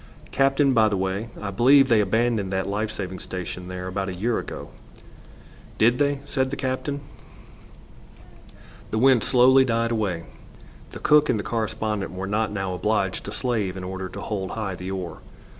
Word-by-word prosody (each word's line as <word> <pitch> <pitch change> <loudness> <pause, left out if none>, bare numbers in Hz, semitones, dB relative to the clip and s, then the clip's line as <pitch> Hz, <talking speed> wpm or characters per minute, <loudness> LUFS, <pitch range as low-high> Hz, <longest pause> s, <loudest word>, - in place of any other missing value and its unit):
"Captain, 135 0 +3
by 110 -3 +4
the 100 - -1
way, 95 +4 -2
I 100 -1 -4
believe 135 +6 +5
they 115 -4 +4
abandoned 110 -1 +1
that 95 0 -1
life 105 +2 -1
saving 95 -3 -5
station 90 0 -6
there 90 0 -6
about 95 +1 -3
a 90 - -5
year 115 +6 0
ago." - - -7 1.1
"Did 120 +3 +4
they?" 140 -1 +1
said 130 -2 0
the 140 - -3
captain. 140 +2 -3 1.9
The 110 - -2
wind 130 -1 +5
slowly 130 +1 +6
died 115 -2 0
away. 100 -7 -1 0.7
The - - -8
cook 150 0 +4
and 120 - +2
the - - -3
correspondent 110 -3 -2
were 95 +1 -4
not 105 +2 0
now 95 -2 -2
obliged 100 0 -1
to - - -5
slave 110 -7 -1
in 95 - -6
order 95 0 -5
to - - -8
hold 95 -3 -3
high 105 -4 -3
the 90 +1 -6
oar. 95 -3 -5
105 Hz, 175 wpm, -24 LUFS, 95-125 Hz, 1.9 s, slowly